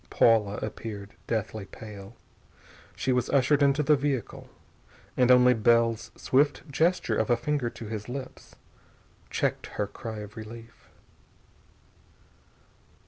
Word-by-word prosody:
Paula 105 -3 +3
appeared, 105 -2 -6
deathly 110 -2 -2
pale. 100 -2 -11 0.8
She 130 - -1
was 125 -1 +1
ushered 140 +1 +3
into 140 +1 +3
the 150 +1 +5
vehicle 135 -4 -3 0.7
and 125 -1 +3
only 125 0 +7
Bell's 115 0 +2
swift 145 +2 +1
gesture 170 +6 +1
of - - 0
a 120 - +4
finger 135 0 -1
to 115 - -10
his 110 +1 -6
lips 130 0 -8 0.7
checked - - -1
her 105 - -3
cry 110 +2 -7
of 105 0 -10
relief. 115 +1 -11
120 Hz, 120 wpm, -27 LUFS, 110-135 Hz, 0.8 s, only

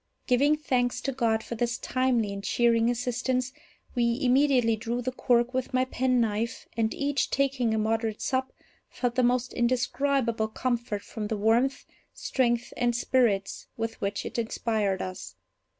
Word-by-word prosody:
Giving 285 +4 +3
thanks 250 -5 0
to 275 - -1
God 225 -4 0
for - - -6
this 240 +1 -1
timely 245 -5 0
and 200 0 -6
cheering 235 +1 +3
assistance, 250 +1 -1 0.4
we 235 -2 +1
immediately 255 -3 +4
drew 230 +2 -3
the 250 +1 -2
cork 245 0 +1
with 260 0 -2
my 255 0 +3
penknife, 235 -3 0
and, 225 -1 +1
each 285 -1 0
taking 270 -4 +1
a 220 - +1
moderate 220 0 0
sup, 260 0 -1 0.4
felt 245 -2 -2
the 255 - +2
most 250 0 +1
indescribable 250 -1 +1
comfort 235 -2 -2
from 215 -2 -5
the 220 - -2
warmth, 235 +6 +2 0.3
strength, 240 -2 0
and 240 -1 +1
spirits 230 -6 +1
with 225 0 -4
which 200 0 -2
it - - -3
inspired 220 -4 -1
us. 185 0 -7
240 Hz, 150 wpm, -27 LUFS, 225-255 Hz, 0.4 s, immediately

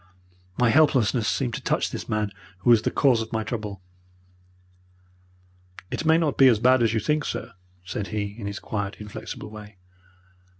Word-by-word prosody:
My 120 -2 +3
helplessness 125 -6 +3
seemed 125 -4 -1
to - - -4
touch - - 0
this - - -6
man 105 -1 -1 0.3
who 120 - +4
was 115 -2 +6
the - - 0
cause 125 -5 +3
of 110 - -6
my 110 -1 -1
trouble. 105 -5 -5 2.1
"'It - - -3
may 160 +1 +5
not 160 -4 0
be 135 - +8
as 120 -4 +5
bad 125 +3 +4
as 115 - +3
you - - +2
think, 150 +7 0
sir,' 115 -4 -5 0.3
said 100 +2 -4
he, 105 -1 -3
in 100 - -5
his 100 0 -4
quiet, 105 -2 -4
inflexible 105 0 -8
way. 105 -2 -11
110 Hz, 175 wpm, -25 LUFS, 105-130 Hz, 2.1 s, be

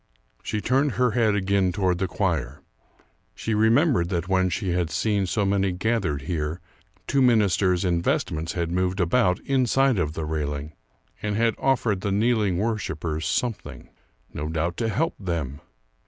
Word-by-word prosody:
She 105 - -3
turned 135 +5 +1
her 125 -1 +2
head 110 -2 +2
again 95 -1 +1
toward 90 -1 0
the 95 - 0
choir. 85 - -2 0.7
She 115 - -3
remembered 110 - +3
that 90 -2 -2
when 95 -1 +2
she 95 +2 -2
had 85 -2 0
seen 100 +2 0
so 105 +2 0
many 95 -1 +1
gathered 90 -7 -1
here, 80 +1 -3 0.5
two 140 - +1
ministers 100 -6 +3
in 85 -2 +1
vestments 80 -1 -1
had 85 -1 -2
moved 90 +2 0
about 90 +1 +2
inside 135 -2 +2
of 75 -3 -1
the 80 -1 -4
railing 75 -1 -3 0.5
and 105 -1 -2
had 115 +1 +2
offered 120 -7 +1
the 100 - -1
kneeling 105 -3 +2
worshipers 85 -7 -2
something. 120 -4 -3 0.4
No 75 +1 -4
doubt 80 +2 -1
to 115 -1 0
help 165 +9 0
them! 80 -7 -3
95 Hz, 155 wpm, -24 LUFS, 85-110 Hz, 0.7 s, remembered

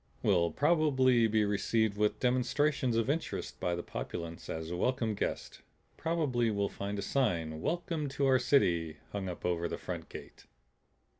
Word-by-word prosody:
"We'll 90 -5 +3
probably 130 - +3
be 110 -1 +2
received 105 +1 +1
with 105 0 +1
demonstrations 130 0 +1
of 115 - +1
interest 155 +4 -3
by 90 -1 0
the 85 - -4
populace 85 -1 -6
as 80 +1 -4
welcome 115 +4 0
guests. 60 -10 -4 0.3
Probably 145 -8 0
we'll 100 -2 0
find 100 +1 -4
a 100 - -3
sign 85 - 0
'Welcome 165 -3 -2
to 140 - +2
our 130 -1 +5
City' 85 - +2
hung 100 -2 -3
up 90 - -7
over 85 -1 0
the - - -4
front - - -6
gate." - - -11
110 Hz, 155 wpm, -32 LUFS, 90-130 Hz, 0.3 s, our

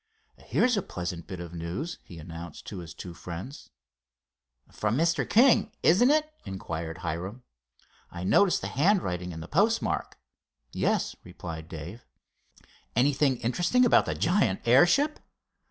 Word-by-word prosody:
"Here's 245 -1 +2
a 200 - +1
pleasant 85 - -6
bit 95 -2 -6
of 85 -1 -8
news," 85 - -5
he 85 - -12
announced 80 0 -9
to 100 - -6
his 85 -2 -8
two 90 - -8
friends. 90 - -8 1.0
"From 105 +3 -1
Mr. 165 +2 +1
King, 240 +3 +5
isn't 200 +10 +5
it?" 310 +1 +2
inquired 85 -5 -5
Hiram. 95 +9 -4 0.7
"I 85 0 -7
noticed 180 - +4
the - - -3
handwriting 125 - +1
and 80 -1 -7
the - - -9
postmark." - - +1 0.5
"Yes," - - 0
replied 85 -3 -8
Dave. 85 +8 -8 0.9
"Anything 135 +1 +3
interesting 175 - +2
about 235 - +4
the - - -1
giant 165 - +1
airship?" 175 - +4
100 Hz, 135 wpm, -28 LUFS, -, 1.0 s, King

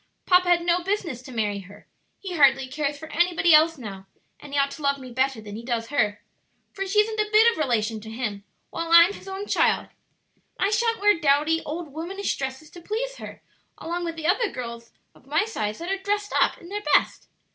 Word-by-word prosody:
Papa 360 -1 +4
had 345 -1 +3
no 350 +1 +2
business 370 - -2
to 260 - -12
marry 210 -4 -1
her. 200 +2 -14 0.3
He 380 -2 -7
hardly 270 -3 +5
cares 290 +2 -3
for 315 +2 -10
anybody 345 -1 +3
else 320 +1 +5
now, 195 -6 -9 0.3
and 290 - -12
he 285 - -2
ought 280 0 +2
to 305 - -9
love 280 -1 +1
me 260 -2 -10
better 260 -1 0
than 205 -1 -9
he 225 - -6
does 235 -2 -3
her; 215 -8 0 0.5
for 390 0 -4
she 420 +2 +4
isn't 435 0 -3
a 425 0 +1
bit 440 +2 +6
of 460 - -7
relation 225 -6 0
to 220 - -10
him, 220 -3 -4 0.3
while 330 0 -4
I'm 340 +3 +8
his - - -12
own 385 +1 -5
child. - - +1 0.7
"And - - +2
I - - 0
sha'n't 460 0 +1
wear 415 -4 +4
dowdy, 305 +2 +2
old 310 -1 -5
womanish 370 +6 -3
dresses 265 +3 -6
to 345 - -12
please - - -4
her, - - -10 0.3
along 345 +2 -4
with 330 -1 -4
other 410 +6 +2
girls 235 -1 -7 0.2
of 265 - -23
my 305 +9 +1
size 215 - -3
that 345 +3 -5
are 390 - -1
dressed 410 +1 -2
up - - +2
in 345 - -13
their 415 +1 -4
best. - - +1
315 Hz, 220 wpm, -24 LUFS, 255-385 Hz, 0.7 s, I'm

